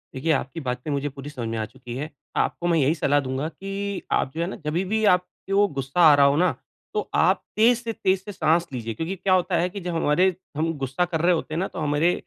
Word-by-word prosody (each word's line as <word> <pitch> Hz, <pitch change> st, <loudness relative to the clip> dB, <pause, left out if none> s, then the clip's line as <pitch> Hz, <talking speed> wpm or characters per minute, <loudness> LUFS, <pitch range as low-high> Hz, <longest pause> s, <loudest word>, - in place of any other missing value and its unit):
देखिए, 150 Hz, +5 st, 0 dB
आपकी 135 Hz, +2 st, -1 dB
बातें 125 Hz, 0 st, -4 dB
मुझे 140 Hz, +1 st, -1 dB
पूरी 140 Hz, +1 st, -9 dB
समझ 125 Hz, -5 st, -5 dB
में 115 Hz, -, -3 dB
आ 110 Hz, -, -1 dB
चुकी 120 Hz, +1 st, -10 dB
हैं। 150 Hz, +3 st, -4 dB, 0.3 s
आपको 175 Hz, -, 0 dB
मैं 170 Hz, -1 st, +3 dB
यही 145 Hz, +3 st, +3 dB
सलाह 145 Hz, -2 st, +2 dB
दूँगा 135 Hz, +2 st, -2 dB
कि 195 Hz, +2 st, -5 dB
आप 130 Hz, -, +1 dB
जो 165 Hz, -, -2 dB
है 170 Hz, -, 0 dB
ना 195 Hz, -, -5 dB
जभी 160 Hz, +5 st, 0 dB
भी 220 Hz, +3 st, 0 dB
आपके 180 Hz, +2 st, -4 dB
वो 205 Hz, +1 st, +5 dB
गुस्सा 135 Hz, +6 st, 0 dB
आ 155 Hz, -3 st, +9 dB
रहा 140 Hz, -1 st, +5 dB
हो 140 Hz, 0 st, +4 dB
ना? 180 Hz, +2 st, +3 dB, 0.4 s
तो 425 Hz, -, -2 dB
आप -, -, +3 dB
तेज 230 Hz, +3 st, +5 dB
से 230 Hz, -1 st, -3 dB
तेज 190 Hz, -2 st, 0 dB
से 205 Hz, -, -7 dB
साँस 170 Hz, -2 st, +2 dB
लीजिए 115 Hz, -2 st, -4 dB
क्योंकि 165 Hz, -, -3 dB
क्या 190 Hz, 0 st, +1 dB
होता 180 Hz, 0 st, +2 dB
है 175 Hz, +2 st, +1 dB
कि 200 Hz, +2 st, -7 dB
जब 175 Hz, -1 st, -3 dB
हमारे 170 Hz, +4 st, +2 dB, 0.2 s
हम 165 Hz, +1 st, 0 dB
गुस्सा 135 Hz, +5 st, 0 dB
कर 165 Hz, -3 st, -2 dB
रहे 175 Hz, +2 st, +4 dB
होते 160 Hz, -2 st, -3 dB
हैं 160 Hz, -, -1 dB
ना 190 Hz, -, 0 dB
तो -, -, -8 dB
हमारे 150 Hz, +3 st, +2 dB
165 Hz, 260 wpm, -24 LUFS, 140-185 Hz, 0.4 s, आ